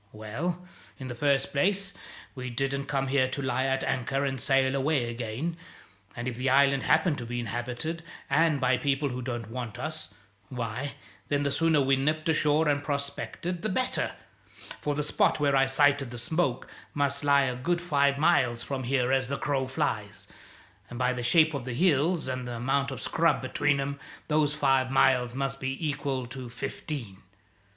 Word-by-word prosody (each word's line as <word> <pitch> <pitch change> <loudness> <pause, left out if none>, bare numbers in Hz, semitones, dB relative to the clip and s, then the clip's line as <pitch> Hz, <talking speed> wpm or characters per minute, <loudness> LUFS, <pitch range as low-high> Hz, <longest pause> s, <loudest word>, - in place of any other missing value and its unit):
Well, 160 +13 -4 0.3
in 130 -1 -7
the - - -3
first 140 +2 +1
place, 195 +6 +1 0.4
we 125 -2 -5
didn't 135 +3 -2
come 135 -1 0
here 130 -1 +3
to 135 - -4
lie 130 -1 0
at 135 0 0
anchor 135 +3 0
and 135 -3 -2
sail 135 0 +3
away 135 -2 +1
again; 120 +8 -4 0.6
and 120 +1 -4
if 120 -2 -3
the 130 +2 0
island 140 0 +4
happened 160 +1 +2
to 120 - -5
be 120 +1 -3
inhabited, 120 +8 -3 0.3
and 160 -3 +3
by 125 -1 +3
people 140 +1 0
who 125 0 -4
don't 120 -3 -5
want 120 -3 -5
us, 155 0 -5 0.4
why, 125 +3 -4 0.3
then, 145 0 +1
the 140 - 0
sooner 160 +1 +3
we 135 0 +3
nipped 155 +4 0
ashore 155 0 +3
and 145 -1 +1
prospected, 145 +4 -3
the 215 - -1
better, 255 +6 0 0.7
for 145 -1 -1
the 150 - 0
spot 150 - +2
where 140 -1 +3
I 135 0 +4
sighted 140 0 +3
the 120 - -7
smoke 135 +1 -1 0.3
must 140 -1 0
lie 140 -1 +5
a 130 -2 -1
good 170 +8 0
five 140 -5 +2
miles 140 -7 +3
from 135 -2 -4
here 125 0 +1
as 135 -1 +2
the 140 +1 -2
crow 135 -2 -1
flies, 115 -8 -3 0.6
and 120 - -7
by 125 0 +1
the 125 - -4
shape 155 +5 +4
of 140 -3 -3
the 125 -1 -4
hills 165 +1 +2
and 130 -1 -3
the 120 - -4
amount 135 +4 0
of 135 - -6
scrub 165 +1 +2
between 140 +2 +1
'em, 140 +1 -3 0.3
those 150 -1 +3
five 135 -3 +2
miles 125 -2 +3
must 135 0 -2
be 135 0 -3
equal 135 -3 -2
to 125 0 -8
fifteen. 125 -4 -6
135 Hz, 185 wpm, -28 LUFS, 125-145 Hz, 0.7 s, lie